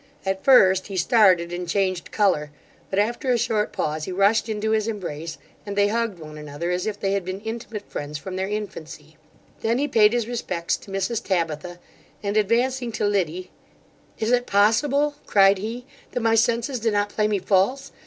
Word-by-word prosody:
At 190 0 -2
first, 190 -9 +5
he 195 -2 -5
started 185 -5 +4
and 175 0 -4
changed 185 -1 -1
colour; 185 -8 +1 0.4
but 190 - -3
after 235 +6 0
a 245 - +3
short 220 -3 0
pause, 155 0 -2
he - - -5
rushed 200 +5 +2
into 220 0 -1
his 220 0 +1
embrace, 170 -7 -5 0.3
and 200 -1 -6
they 205 0 +3
hugged 230 -3 -1
one 155 -2 -10
another 150 +4 -4
as 180 +3 -1
if 205 -1 -3
they 195 - -1
had 200 -1 0
been 185 +2 -5
intimate 220 -1 -6
friends 145 +1 -5
from 185 +5 -7
their 190 +1 -2
infancy: 160 -7 -6 0.5
then 230 +1 +1
he 285 +2 0
payed 215 -5 +5
his 240 -2 0
respects 225 -8 -2
to 195 - -14
Mrs 195 +4 -2
Tabitha, 175 -1 -2 0.5
and 200 0 -2
advancing 240 +4 +1
to 215 - -1
Liddy, 185 -3 -1 0.7
'Is 220 +1 -1
it 245 0 +2
possible, 280 +9 +2
(cried 195 -1 +5
he), 230 +5 -5 0.3
that 245 - -1
my 225 0 +2
senses 235 +3 +1
do 225 +1 +1
not 205 -1 0
play 210 +1 0
me 210 -1 +1
false! 195 +8 +1
205 Hz, 190 wpm, -23 LUFS, 185-225 Hz, 0.7 s, first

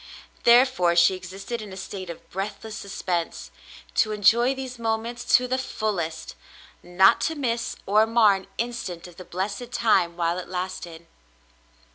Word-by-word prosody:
Therefore 235 -8 +5
she 170 +2 +5
existed 195 +5 -6
in 210 -2 -9
a 190 - -8
state 190 -1 -7
of 170 - -9
breathless 210 +3 -5
suspense, 180 -5 -4 0.4
to 215 - +2
enjoy 235 +5 +4
these 260 -2 -7
moments 230 +1 -2
to 250 0 -3
the 260 +1 0
fullest, 185 -10 -3 0.3
— - - -25
not 180 +2 +4
to 320 - 0
miss 235 -5 -2
or 215 +3 +4
mar 225 -3 +5
an 195 0 -5
instant 230 -8 -4
of 175 -1 -13
the 185 - -8
blessed 200 +7 -4
time 175 -8 +2
while 170 +1 0
it 180 - -8
lasted. 180 -2 -5
200 Hz, 155 wpm, -25 LUFS, 180-235 Hz, 0.4 s, Therefore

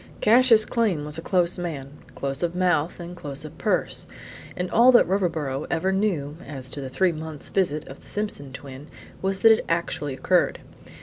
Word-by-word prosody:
Cassius 230 0 +6
Came 205 -11 0
was 150 +2 -4
a - - -5
close 180 0 +1
man, 145 -6 -5 0.2
close 135 0 -3
of 175 0 -1
mouth 175 -3 +1
and 175 +1 -7
close 145 -3 -6
of 155 - -10
purse; - - 0 0.5
and 180 0 -3
all 240 +3 +7
that 240 - +6
Riverboro 160 -7 -1
ever 185 +4 0
knew 175 -7 -1
as 130 -3 -7
to 145 - -3
the 135 - -5
three 185 +7 +2
months' 155 -2 -6
visit 155 -6 0
of 135 - -10
the - - -15
Simpson 205 -10 -4
twin 135 +1 -10 0.3
was 190 0 -1
that 225 - +8
it 220 - +3
actually 160 -4 -1
occurred. 180 +6 +2
170 Hz, 185 wpm, -24 LUFS, 145-190 Hz, 0.5 s, that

